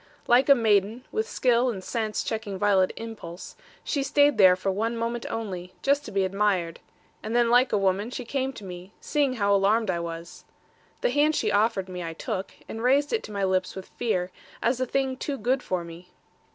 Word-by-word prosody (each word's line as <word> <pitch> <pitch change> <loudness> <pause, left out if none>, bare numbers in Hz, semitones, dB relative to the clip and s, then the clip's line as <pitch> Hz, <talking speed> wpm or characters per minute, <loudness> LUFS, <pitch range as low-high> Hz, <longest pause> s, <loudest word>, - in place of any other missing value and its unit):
Like 250 +4 +4
a 280 - +9
maiden, 220 0 +1
with 440 +1 -2
skill 250 0 +2
and 195 -6 -5
sense 220 -1 -2
checking 220 -3 -4
violent 190 -2 +3
impulse, 215 -6 -8 0.3
she 285 - -1
stayed 285 0 +3
there 185 -2 +8
for 190 +1 -1
one 225 +4 -1
moment 230 +1 -3
only, 185 -5 -5
just 280 +1 +2
to - - -7
be 195 -1 +1
admired; 190 -4 0 0.4
and 220 +2 -4
then 240 -1 +3
like 245 +2 +4
a - - +2
woman, 195 +2 +1
she 250 0 -6
came 265 +2 -1
to 215 - -11
me, 180 +1 -9
seeing 285 -3 0
how 200 -4 +1
alarmed 200 +2 +3
I 170 - -2
was. 170 0 -7 0.6
The - - +1
hand 300 +1 +3
she 215 -6 0
offered 205 -2 +1
me 180 -1 -6
I 165 -1 -5
took, 195 +2 -4 0.2
and 225 - -6
raised 275 - +2
it 450 - +1
to - - -10
my 200 -1 -2
lips 185 -1 0
with 190 -1 -8
fear, 185 -6 -2 0.3
as 245 +2 0
a 255 - 0
thing 265 0 -1
too 280 +1 -3
good 255 +4 0
for 185 -6 -2
me. 170 +2 -11
215 Hz, 205 wpm, -26 LUFS, 190-250 Hz, 0.6 s, a